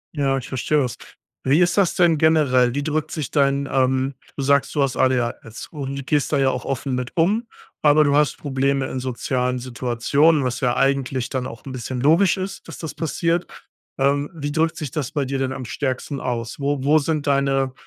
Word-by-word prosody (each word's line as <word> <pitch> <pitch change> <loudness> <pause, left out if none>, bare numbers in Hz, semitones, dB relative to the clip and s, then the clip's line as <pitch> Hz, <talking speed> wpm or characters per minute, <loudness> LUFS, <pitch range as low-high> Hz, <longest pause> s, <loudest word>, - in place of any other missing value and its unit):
Ja, 135 -2 +1
ich 130 - -6
verstehe 135 +3 0
das. 125 -5 -2 0.5
Wie 140 +5 +3
ist 175 -1 +3
das 195 -4 +2
denn 170 -3 +4
generell? 140 -6 +3
Wie 145 - -1
drückt 155 0 -1
sich 155 -5 -4
dein 140 -1 +2
ähm, 130 +1 +1 0.2
du 140 - -2
sagst, 140 0 +2
du 145 - +3
hast 135 -2 -1
ADHS 120 -3 -1
und 140 -3 -5
gehst 145 -2 +1
da 145 - +2
ja 135 -1 +3
auch - - -5
offen 135 0 -3
mit 125 -1 -4
um, 210 +8 +2 0.3
aber 150 0 +5
du 145 0 +2
hast 150 -1 +2
Probleme 135 -1 0
in 130 - -4
sozialen 125 0 -1
Situationen, 130 +5 +1
was 125 -1 -2
ja 125 -1 +1
eigentlich 135 -2 0
dann 130 -2 -2
auch 115 -2 -10
'n 135 - -7
bisschen 125 0 -5
logisch 165 +8 +4
ist, 190 +1 -6
dass - - -8
das 160 - -6
passiert. 170 +2 -1 0.5
Ähm, 140 +2 +1
wie 145 -2 -4
drückt 160 +1 0
sich 145 -5 -5
das 150 -3 -3
bei 145 -4 -1
dir 135 +1 -2
denn 130 0 -1
am 130 -2 -5
stärksten 135 +2 -3
aus? 120 0 -3
Wo 140 -1 -1
wo 150 +3 +4
sind 150 0 -1
deine, 135 -1 +1
140 Hz, 205 wpm, -22 LUFS, 130-150 Hz, 0.5 s, aber